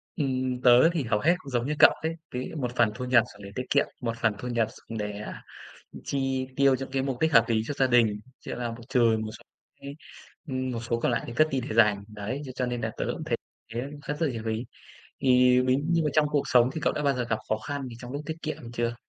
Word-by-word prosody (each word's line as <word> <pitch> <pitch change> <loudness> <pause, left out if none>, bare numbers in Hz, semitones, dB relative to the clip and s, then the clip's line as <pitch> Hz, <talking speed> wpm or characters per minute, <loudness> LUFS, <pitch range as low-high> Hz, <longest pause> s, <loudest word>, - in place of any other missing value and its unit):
Ừm, 130 -4 -1
tớ 125 +5 +7
thì 160 -5 0
hầu 110 -3 +1
hết 170 +9 +3
cũng 140 - -11
giống 120 -1 0
như 150 - 0
cậu - - +9
ấy, 160 +1 -2 0.2
ví 125 +1 -3
dụ - - -9
một 125 0 -3
phần 120 -3 +3
thu 125 - -4
nhập 125 -2 +5
dùng 105 - -14
để 100 - -9
tiết 125 - -2
kiệm, - - +3 0.2
một 115 -2 -2
phần 110 -2 +2
thu 125 - -5
nhập 115 -2 +1
dùng 115 - -9
để, 105 0 -2
ờ, 105 - -6 0.7
chi 135 -1 -1
tiêu 140 -1 +4
cho 135 +1 -5
cái 135 -1 0
mục 135 -2 -3
đích 160 -1 +2
hợp 115 -2 +7
lý 110 -1 +2
cho 145 - -3
gia 135 - +3
đình, 115 -4 +3 0.2
chỉ - - -9
là 120 -1 -3
một 115 +1 -9
trừ 120 -4 +3
một 110 - -5
số - - -18 0.4
cái 140 +1 -8 0.5
ừm, 130 -1 -2
một 115 - -3
số 115 0 +1
còn 120 - +1
lại 115 - 0
thì 120 - -6
cất 155 +4 +4
đi 135 -1 0
để 110 - -3
dành. 105 -3 +4
Đấy, 105 +6 -5
thế 130 - -6
cho 130 - 0
nên 120 -1 -3
là 110 0 -2
tớ - - -1
cũng - - -6
thấy - - -1 0.4
thế 120 - -2 0.3
cất 150 +1 -3
rất 165 - +2
là 145 - 0
nhiều 115 - -5
rồi 110 0 -1
ấy. 115 +3 -4 0.6
Thì 125 -1 +5
ví 130 0 +3
như 170 0 +2
mà 150 - +1
trong 155 -1 +4
cuộc 145 -2 +2
sống 125 -1 +5
thì 160 - -4
cậu - - +1
đã 150 - -3
bao 140 -1 +2
giờ 125 -1 -1
gặp 110 - +1
khó 110 - +1
khăn 145 +4 -5
gì 120 - -9
trong 125 +1 -8
lúc 145 +1 -4
tiết 160 0 -4
kiệm 125 -6 -5
chưa? 120 0 -1
125 Hz, 285 wpm, -27 LUFS, 115-135 Hz, 0.7 s, cậu